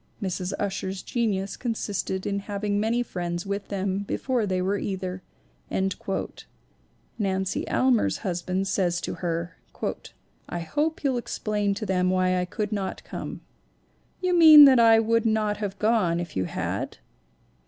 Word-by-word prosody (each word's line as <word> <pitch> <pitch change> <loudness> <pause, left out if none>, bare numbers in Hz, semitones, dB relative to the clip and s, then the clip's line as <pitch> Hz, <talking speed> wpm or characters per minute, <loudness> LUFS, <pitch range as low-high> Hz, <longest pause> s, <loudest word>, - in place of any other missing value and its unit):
Mrs. 185 -2 -3
Ussher's 195 -1 -3
genius 205 -5 -1
con 235 -3 -2
sisted 190 -3 -3
in 200 0 -1
having 205 0 -2
made 230 +3 +1
friends 175 -2 -4
with 200 0 -3
them 195 -1 -2
before 230 +3 -1
they 185 -1 0
were 195 +2 0
either." 185 -2 -4 2.0
Nancy 190 -2 -1
Almar's 255 -3 +2
husband 185 +1 -1
says 175 -3 +1
to - - -3
her: 170 -1 -3 0.4
' - - -20
'I 175 - -3
hope 300 - -2
you'll 265 -3 +1
explain 210 -4 -1
to 215 - -4
them 185 -2 +1
why 185 0 +2
I 180 - 0
could 210 +3 -4
not 200 -3 -3
come/: - - -7 0.8
'You 365 -1 +1
mean 310 -3 +10
that 260 -3 +6
I 225 -1 +7
would 230 +1 +2
not 215 -2 +1
have 200 -2 -4
gone 210 -6 +2
if 175 -2 -6
you 95 -1 0
had?' - - -3
200 Hz, 150 wpm, -26 LUFS, 185-220 Hz, 2.0 s, mean